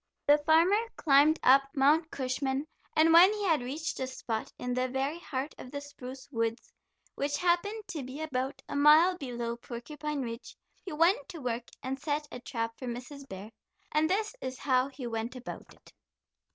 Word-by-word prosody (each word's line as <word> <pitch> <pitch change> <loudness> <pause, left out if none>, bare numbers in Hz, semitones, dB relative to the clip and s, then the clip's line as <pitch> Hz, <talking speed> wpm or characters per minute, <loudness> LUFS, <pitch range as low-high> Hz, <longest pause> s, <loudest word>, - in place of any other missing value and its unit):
The 295 +1 +6
farmer 330 +7 +4 0.2
climbed 295 +1 +4
up 270 +2 +7
Mount 300 +4 +4
Cushman, 265 +1 -2 0.3
and 320 +1 +5
when 355 +4 +9
he 420 -1 -3
had 320 -7 +3
reached 300 +7 -4
a 260 - -1
spot 230 -3 -4
in 250 0 -3
the 255 +1 0
very 270 +5 -2
heart 280 -2 -4
of 250 - -9
the 285 - -5
spruce 265 -2 -10
woods, 230 -1 -2 0.4
which 285 +1 -1
happened 360 +5 +1
to 315 - -4
be 260 +3 -7
about 270 -4 -3
a - - -5
mile 305 +5 +6
below 240 -6 -4
Porcupine 285 +5 -5
Ridge, 230 0 -7 0.3
he 375 - -7
went 330 0 +2
to 355 - -7
work 245 -2 -3 0.2
and 265 +1 -3
set 300 +1 -2
a 250 - -6
trap 230 -2 -4
for 255 - -6
Mrs. 255 +3 -7
Bear, 195 +3 -8 0.4
and 310 +1 +2
this 425 +5 0
is 260 0 -4
how 255 -1 +2
he 275 -2 -8
went 230 +1 -3
about 255 0 -8
it. - - -19
275 Hz, 180 wpm, -30 LUFS, 250-315 Hz, 0.4 s, when